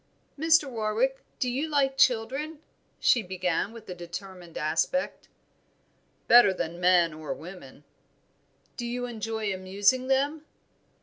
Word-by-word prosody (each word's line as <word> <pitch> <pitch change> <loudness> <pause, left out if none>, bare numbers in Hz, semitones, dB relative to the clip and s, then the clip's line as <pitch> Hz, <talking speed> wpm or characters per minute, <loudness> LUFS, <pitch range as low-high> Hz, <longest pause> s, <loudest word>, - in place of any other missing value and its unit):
"Mr. 315 0 +4
Warwick, 235 +2 -1 0.2
do 255 - -1
you 270 +6 -1
like 275 -3 +1
children?" 265 +5 +1 0.4
she 240 - +4
began, 185 0 -2
with 230 -1 -12
a 180 - -5
determined 175 0 -9
aspect. 160 - -1 1.0
"Better 235 -5 +7
than 170 -1 -4
men 175 -2 +4
or 155 -1 -5
women." 160 -5 -12 0.9
"Do 240 - -3
you 245 +1 -3
enjoy 220 -3 -3
amusing 200 +7 +1
them?" 285 +3 +1
220 Hz, 120 wpm, -27 LUFS, 180-265 Hz, 1.0 s, Better